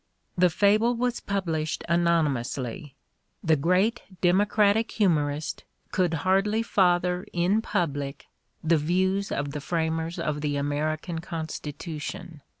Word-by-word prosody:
The 180 0 +4
fable 210 +7 +3
was 245 0 -1
published 165 -6 -2
anonymously: 145 -6 0 0.5
the 160 -1 +4
great 180 - +2 0.2
demo 185 +3 +4
cratic 210 +2 +2
humorist 155 -7 0 0.3
could 175 -3 +1
hardly 205 +4 +2
father 180 -3 +2
in 180 +5 +2
public 145 -8 -2 0.4
the 165 +1 +4
views 185 +5 0
of 140 0 -2
the 150 - -5
framers 160 +1 -1
of 150 -1 -2
the 145 -1 -1
American 155 +4 -2
Constitution. 160 -1 -6
170 Hz, 115 wpm, -26 LUFS, 150-190 Hz, 0.5 s, The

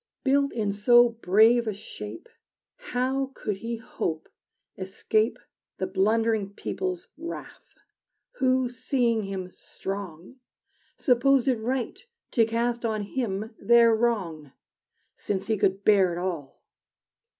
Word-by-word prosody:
Built 280 +1 +2
in 215 -3 -1
so 240 +4 +6
brave 230 +2 +4
a 215 - -1
shape, 110 - -8 0.5
How 270 - -2
could 205 -2 -3
he 230 +3 -4
hope 160 -8 -4 0.5
escape 215 +4 0 0.4
The 190 - -1
blundering 205 +1 +1
people's 370 - -4
wrath? 335 +1 -8 0.6
Who, 260 -1 +2
seeing 240 -3 0
him 190 -2 -5
strong, 195 +3 -7 0.6
Supposed 265 0 +3
it 250 -4 +2
right 250 - -3 0.3
to 230 - +4
cast 235 +1 -1
on 215 -2 -1
him 215 -1 -3
their 235 -1 +5
wrong, 185 - -1 0.6
Since 195 -2 -3
he 220 - +1
could 195 -1 +1
bear 195 -4 +5
it - - -5
all! 170 -7 -5
225 Hz, 115 wpm, -26 LUFS, 195-245 Hz, 0.6 s, so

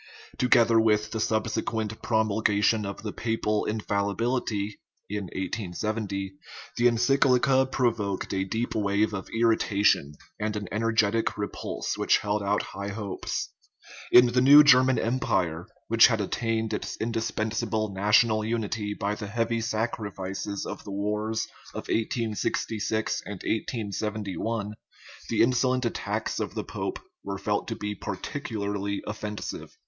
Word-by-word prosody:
Together 120 -3 +5
with 105 -1 +2
the 110 - -3
subsequent 110 0 -1
promulgation 110 -1 +2
of 100 - -7
the 105 - -4
papal 110 -2 -1
infallibility 105 0 -1 0.3
(1870), 100 0 -3 0.4
the 120 - +4
en 120 -1 +2
cyclica 130 +1 +3
provoked 110 -8 0
a 95 0 +1
deep 115 +5 -2
wave 105 0 +1
of 95 -1 -5
irritation 105 -9 +3 0.3
and 105 0 -1
an 105 -2 -4
en 105 - -2
ergetic 115 -1 +1
repulse 100 -1 -4
which - - +4
held 105 0 -1
out 100 +1 +1
high 100 +1 -5
hopes. 100 -1 -4 0.6
In 125 - +9
the 125 - +4
new 145 +3 +9
German 130 -3 +6
empire, 95 -9 0 0.2
which 115 0 +7
had 115 -3 0
attained 110 +2 -1
its - - -4
indis 115 0 -2
pensable 110 -1 -1
national 110 +3 +3
unity 110 -2 -2
by 100 +1 -1
the 105 -1 -6
heavy 115 +2 -1
sacrifices 105 -3 -3
of - - -6
the - - -9
wars 105 +2 -1 0.3
of - - -6
1866 110 -1 -1
and 105 - -4
1871, 105 0 -3 0.6
the - - +4
insolent 125 +1 +2
attacks 115 - -2
of - - -3
the - - -2
pope - - -4 0.3
were - - -4
felt - - -1
to - - -3
be 105 0 -3
particularly 100 -1 -4
offensive. 105 -1 -6
110 Hz, 130 wpm, -27 LUFS, 100-115 Hz, 0.6 s, In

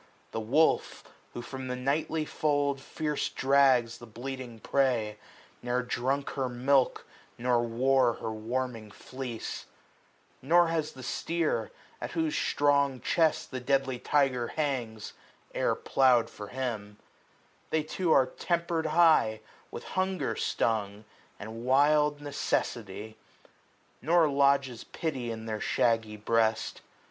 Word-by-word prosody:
The 115 - -3
wolf, 135 +9 +1 0.3
who 120 - -5
from 130 +1 -7
the 125 - -2
nightly 150 +4 -1
fold 145 -3 0
Fierce 150 +1 -2
drags 130 -4 +3
the 120 - -11
bleating 125 +1 -7
prey, 115 -6 0 0.4
ne'er 125 +1 -1
drunk 130 +3 -1
her 130 -2 -2
milk 130 +2 +1 0.3
Nor 120 0 +2
wore 125 +1 +2
her 110 - -5
warming 115 0 -3
fleece: 125 +2 -7 0.7
Nor 170 +5 +4
has 160 -2 -1
the 130 - -11
steer. 165 +5 -1 0.3
At - - -5
whose 320 -2 0
strong 140 -2 +2
chest 160 +3 +1
the 130 - -3
deadly 135 0 0
tyger 130 -5 +1
hangs. 125 -8 -3 0.4
E'er - - +1
plow'd 125 -4 +3
for 105 - -8
him. 110 -5 -4 0.7
They 160 -1 +1
too 165 +2 -1
are 135 -4 +6
tempered 170 +1 -1
high, 155 -9 +4 0.3
345 - - -35
With - - -7
hunger 185 -6 -1
stung, 105 -2 -1 0.3
and 110 +2 -7
wild 145 +3 +3
necessity 115 -7 -2
j 110 - -20 0.8
Nor 165 +3 +4
lodges 140 -3 +2
pity 135 -7 -4
in 110 -1 -5
their 110 -1 -4
shaggy 110 -2 +1
breast. 110 +1 0
130 Hz, 125 wpm, -29 LUFS, 115-145 Hz, 0.8 s, are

